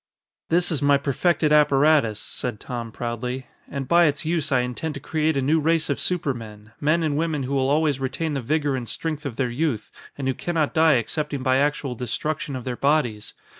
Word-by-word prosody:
"This 175 +2 +2
is 150 - 0
my 145 0 +5
perfected 150 +2 +1
apparatus," 145 -6 +4
said 120 -4 -5
Tom 120 -2 -5
proudly, 125 +3 -4 0.2
"and 135 -2 -4
by 170 +4 +5
its 145 +1 0
use 160 -2 0
I 130 -2 +4
intend 125 +5 -4
to - - -5
create 155 +1 0
a 135 - +1
new 155 +4 +3
race 160 0 +2
of 140 - -1
supermen, 115 - -3
men 155 +3 +2
and 150 -2 0
women 155 -2 -1
who 130 - -4
will 135 -1 +1
always 150 -2 +2
retain 135 +4 -2
the 135 - -2
vigor 145 +2 0
and 120 -3 -4
strength 155 -2 -3
of 125 - -6
their 125 0 -1
youth 125 -5 -2 0.3
and 135 -2 -3
who 130 - +2
can 175 +6 -4
not 155 -3 +1
die 160 -2 +5
excepting 145 +3 -2
by 130 0 +3
actual 145 -1 0
destruction 140 +5 -3
of 125 - -5
their 125 0 -3
bodies. 125 -7 0
140 Hz, 205 wpm, -24 LUFS, 125-155 Hz, 0.3 s, my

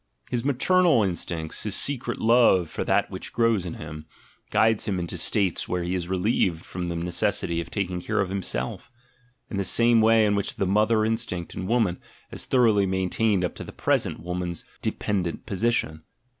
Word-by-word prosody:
His 120 -2 -1
"maternal" 155 - +3
instinct, 85 -4 -3
his 105 -2 -1
secret 125 -4 0
love 110 -8 +4
for - - -3
that - - +1
which - - -6
grows 115 -6 +1
in 85 - -5
him, 75 0 -9 0.4
guides 110 0 +2
him 100 -3 0
into 85 -1 -4
states 95 -4 0
where 90 -1 -1
he 90 +1 -2
is 90 -2 -2
relieved 95 -3 0
from 90 -1 -5
the 85 - -3
necessity 85 0 -1
of 85 - -9
taking 90 -3 -3
care 110 +4 -1
of 100 - 0
himself, 95 - -3 0.6
in 100 - -3
the 100 - 0
same 115 +4 +4
way 110 0 +5
in 105 - +2
which 100 -1 -2
the 100 - -1
"mother" 110 +3 +2
instinct 110 -6 -2
in 95 - -5
woman 110 -6 +1 0.3
has - - -5
thoroughly 110 -6 +3
maintained 95 +1 +1
up 90 - -4
to - - -8
the - - -9
present - - 0
woman's 90 0 -4 0.2
dependent 90 -5 -2
position. 100 -6 -1
95 Hz, 180 wpm, -25 LUFS, 90-115 Hz, 0.6 s, way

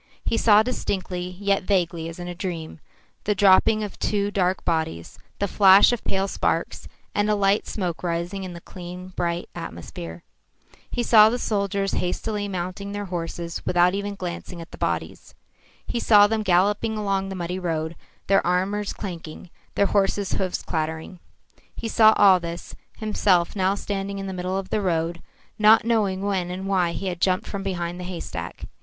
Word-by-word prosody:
He - - +1
saw 215 -2 +5
distinctly, 180 -6 -3
yet 200 -1 +1
vaguely 175 -4 0
as 165 - -9
in 175 0 -6
a 175 - -4
dream, 170 -3 -5 0.5
the 210 - +1
dropping 205 +3 +5
of 205 - -7
two 205 -1 0
dark 185 -2 0
bodies, 160 - -2 0.2
the 200 - 0
flash 195 +2 +7
of 240 - -3
pale 195 0 0
sparks, - - -2 0.3
and 205 0 +1
a 210 - +3
light 200 0 +2
smoke 180 -5 -3
rising 175 +3 -3
in 185 -1 -6
the 170 - -9
clean, 180 0 -9
bright 175 -1 -2
atmosphere. 85 0 -8 0.7
He 240 - -2
saw 220 -2 +7
the 240 - -1
soldiers 200 -3 -1
hastily 205 +3 -2
mounting 190 +2 -4
their 205 0 -4
horses 170 0 -4
without 180 0 +3
even 200 +1 -3
glancing 180 -1 -6
at 165 - -10
the - - -10
bodies. - - -3 0.5
He 240 - -2
saw 205 -3 +6
them 220 +1 0
galloping 205 +3 +2
along 195 -2 -1
the 190 - -5
muddy 180 +1 -3
road, 165 -2 -2 0.3
their 195 0 +3
arms 195 +4 0
clanking, 170 -3 -8 0.2
their 200 - +3
horses' 200 -1 +1
hoofs 185 -2 -2
clattering. 160 +2 -4 0.6
He 230 - -5
saw 220 -1 +6
all 195 -3 +6
this, 170 0 -7 0.2
himself 200 -5 +1
now 190 0 +2
standing 200 -1 -4
in 195 - -5
the 190 - -4
middle 185 +1 -2
of 195 -1 -5
the 215 - +1
road, 170 -2 -1 0.4
not 215 +1 +6
knowing 205 -5 +1
when 190 -3 -1
and 185 +2 -5
why 185 -3 +1
he 195 - -5
had 175 -2 -3
jumped 185 -1 +2
from 200 - -5
behind 175 -2 -3
the - - -5
haystack. 180 -2 -6
190 Hz, 175 wpm, -24 LUFS, 175-205 Hz, 0.7 s, flash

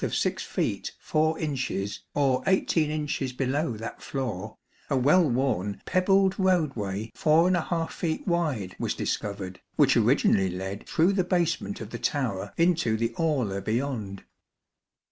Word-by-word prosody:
of - - -1
6 - - 0
feet - - -2
4 155 +1 +1
inches 130 -9 -2 0.2
or 135 -3 +2
18 170 -5 +2
inches 150 -4 -2
below 130 -1 -1
that 115 +2 -7
floor, 125 -9 -4 0.3
a 135 - +2
well 150 +5 +4
worn 120 -6 0
pebbled 190 +1 +3
roadway 120 - 0
4 165 +1 +2
feet 160 -2 -3
wide 150 - -1
was - - -1
dis - - 0
covered, 100 -3 -6
which - - +4
originally 95 -1 +3
led 95 +3 -5
through 175 +5 +3
the 190 -2 +2
basement 170 - 0
of 110 0 -7
the 115 - -5
tower 105 -9 -1
into 165 -10 +2
the 115 +1 -1
aula 130 -12 0
beyond. 110 -4 -3
135 Hz, 140 wpm, -27 LUFS, 105-165 Hz, 0.3 s, well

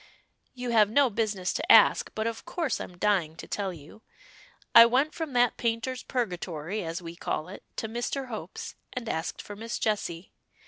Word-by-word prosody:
"You 245 -1 -3
have 215 -3 +5
no 265 +2 +4
business 205 -4 -1
to - - +1
ask, 485 -2 +7
but 220 - -1
of 230 0 -3
course 330 -6 -2
I'm 180 - -8
dying 180 -6 +1
to - - -9
tell 200 -2 -2
you. 160 +5 -13 0.7
I 230 - +12
went 265 +6 +2
from 320 -5 -4
that 245 -1 +3
Painter's 235 +2 -1
Purgatory 185 - -3
as 165 +2 -4
we 165 0 -7
call 155 -1 -3
it, 195 - -9
to 220 - -3
Mr. 240 +4 -3
Hope's, 210 -7 -6 0.2
and 250 -2 -5
asked 160 -4 -3
for 205 - -8
Miss 230 +3 -4
Jessie. 195 -5 -2
220 Hz, 180 wpm, -28 LUFS, 180-245 Hz, 0.7 s, I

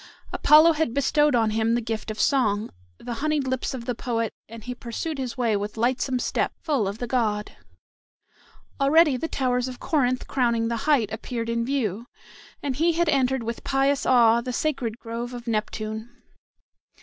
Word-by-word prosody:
Apollo 310 +2 +6
had 310 -6 -1
bestowed 295 0 +3
on 225 -2 +2
him 225 +1 +1
the - - +1
gift 225 -1 -4
of 215 - -5
song, 215 -7 +1 0.3
the 245 - -6
honeyed 305 -2 0
lips 260 +1 -2
of 235 -2 -7
the 245 - -1
poet, 230 -1 -2 0.2
and 230 -1 -10
he 250 - -5
pursued 250 +6 -5
his 255 -1 -4
way 235 -4 +1
with 205 +2 -4
lightsome 255 +2 0
step, 245 - -1
full 280 - 0
of 200 +2 -4
the 245 - -4
god. 220 -4 -1 1.2
Already 295 +1 +5
the 290 +6 -3
towers 250 -4 0
of 255 -1 -7
Corinth 255 -5 0
crowning 235 -3 0
the 235 - -1
height 230 -8 +3
appeared 230 +1 -4
in 230 0 0
view, 235 -4 -2 0.6
and 270 -3 -2
he 335 +2 +3
had 340 0 +1
entered 265 -3 +1
with 230 +1 -5
pious 270 +1 +1
awe 235 -2 +5
the 250 +1 -4
sacred 245 -6 -2
grove 240 +1 -6
of 240 -1 -8
Neptune. 220 0 -3
245 Hz, 175 wpm, -25 LUFS, 230-275 Hz, 1.2 s, Apollo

